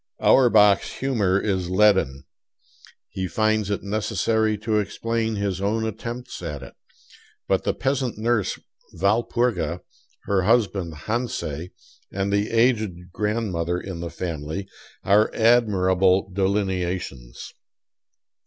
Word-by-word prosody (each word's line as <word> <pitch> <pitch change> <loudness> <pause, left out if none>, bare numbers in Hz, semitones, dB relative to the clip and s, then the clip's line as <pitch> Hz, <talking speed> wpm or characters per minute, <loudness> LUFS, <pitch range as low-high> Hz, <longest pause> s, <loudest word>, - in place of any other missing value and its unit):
Auerbach's 105 -6 +5
humor 105 -8 +1
is 95 -4 -1
leaden; 95 -9 +3 0.9
he 95 -1 -4
finds 110 +2 +1
it 100 - -2
necessary 110 +1 0
to 110 +1 0
explain 115 +2 -2
his 100 -2 -2
own 110 +3 0
attempts 115 +2 -6
at 75 -6 -5
it. 70 - -11 0.7
But 95 -1 +1
the - - 0
peasant 135 -4 -1
nurse 110 -2 0 0.4
Walpurga, 100 -3 0 0.4
her 100 -2 +1
husband 100 -5 +1
Hansei, 110 - -3 0.4
and 100 +1 -2
the 100 +1 +1
aged 110 -7 +1
grandmother 100 -6 -1
in 95 -3 -7
the 85 0 -4
family, 85 +2 -5 0.4
are 105 +2 +4
admirable 95 -5 +3
delineations. 90 -10 -2
100 Hz, 105 wpm, -23 LUFS, 90-110 Hz, 0.9 s, Auerbach's